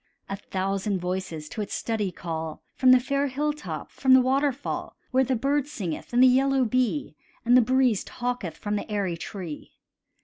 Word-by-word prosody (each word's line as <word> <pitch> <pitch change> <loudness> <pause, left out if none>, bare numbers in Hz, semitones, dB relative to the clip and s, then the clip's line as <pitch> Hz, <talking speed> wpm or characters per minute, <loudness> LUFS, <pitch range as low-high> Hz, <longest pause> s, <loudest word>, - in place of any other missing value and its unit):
A 195 - -3
thousand 195 +1 -2
voices 180 -4 -4
to 215 - -4
its 205 - -4
study 215 -4 -1
call, 160 -3 -5
From 260 - +3
the 255 - +8
fair 275 +3 0
hilltop, 295 +3 -3
from 260 -1 +4
the - - +8
waterfall, 270 +2 0 0.2
Where 260 +1 +4
the 260 0 0
bird 280 +4 0
singeth, 185 - -5
and 245 +1 +5
the - - +9
yellow 265 +1 +3
bee, 220 -11 0 0.3
And 240 +1 +5
the 255 - +8
breeze 255 -3 +2
talketh 240 -10 -4
from 210 0 -2
the - - -6
airy 200 -4 -1
tree. 170 -2 -7
240 Hz, 175 wpm, -26 LUFS, 190-260 Hz, 0.3 s, the